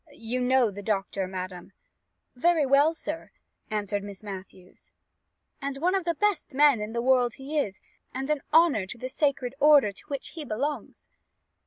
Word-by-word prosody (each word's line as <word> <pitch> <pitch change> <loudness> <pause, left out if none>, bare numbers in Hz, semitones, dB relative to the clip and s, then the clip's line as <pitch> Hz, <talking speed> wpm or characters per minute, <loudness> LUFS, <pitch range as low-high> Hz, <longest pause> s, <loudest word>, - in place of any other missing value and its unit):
You 235 +2 -3
know 250 -3 +3
the 200 +1 -8
doctor, 195 -2 -1
madam 185 0 -7 0.3
" - - -52
"Very 320 +3 +3
well, 285 +4 +4
sir," 320 0 -6 0.4
answered 205 -1 -2
Miss 200 0 -10
Matthews, 190 -2 -10 0.7
"and 275 0 -3
one 350 +6 +1
of 380 -3 0
the 340 -1 0
best 405 -7 0
men 285 -5 +5
in 210 +1 -5
the 235 0 -1
world 250 -2 +3
he 285 +3 -3
is, 195 -9 -3 0.3
and 265 +1 -4
an 300 -2 0
honour 310 - +4
to 235 - -8
the 255 +2 -5
sacred 265 -3 0
order 290 -7 +6
to 200 - -18
which 280 -2 -5
he 320 - -7
belongs." 280 +4 -4
255 Hz, 175 wpm, -27 LUFS, 205-295 Hz, 0.7 s, order